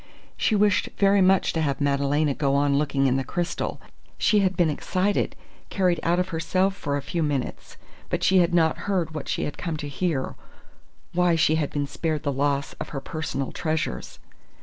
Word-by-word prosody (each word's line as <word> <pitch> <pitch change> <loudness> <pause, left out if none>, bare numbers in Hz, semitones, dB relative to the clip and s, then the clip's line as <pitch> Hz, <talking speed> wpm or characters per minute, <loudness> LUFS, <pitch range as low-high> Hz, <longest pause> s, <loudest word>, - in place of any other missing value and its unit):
She 220 - +1
wished 205 -3 +3
very 200 0 +4
much 190 0 +3
to 160 - 0
have 140 -3 0
Madalena 140 +1 +1
go 140 -1 0
on 140 0 +2
looking 140 -1 +1
in 130 0 +3
the 135 - -1
crystal. 170 +6 -3 0.4
She 210 - +3
had 190 -2 +1
been 170 -3 +3
excited, 185 +6 0 0.3
carried 180 -4 +1
out 170 +2 +1
of 180 +1 -1
herself 185 +4 0
for 145 -6 -2
a 140 - -5
few 170 +4 -2
minutes, 145 -4 -3 0.3
but - - -1
she 190 0 +5
had 175 0 +3
not 165 +2 +1
heard 175 -5 0
what 155 -3 -5
she - - -1
had 150 - -5
come 165 -3 -3
to 145 - -5
hear 145 -2 -2 0.8
why 175 -1 +3
she 155 -1 +3
had 155 -3 0
been 145 -1 -2
spared 155 +1 -3
the 145 - 0
loss 140 +1 0
of - - -5
her 140 - -4
personal 140 -2 -4
treasures. 155 - -3
160 Hz, 195 wpm, -25 LUFS, 140-180 Hz, 0.8 s, she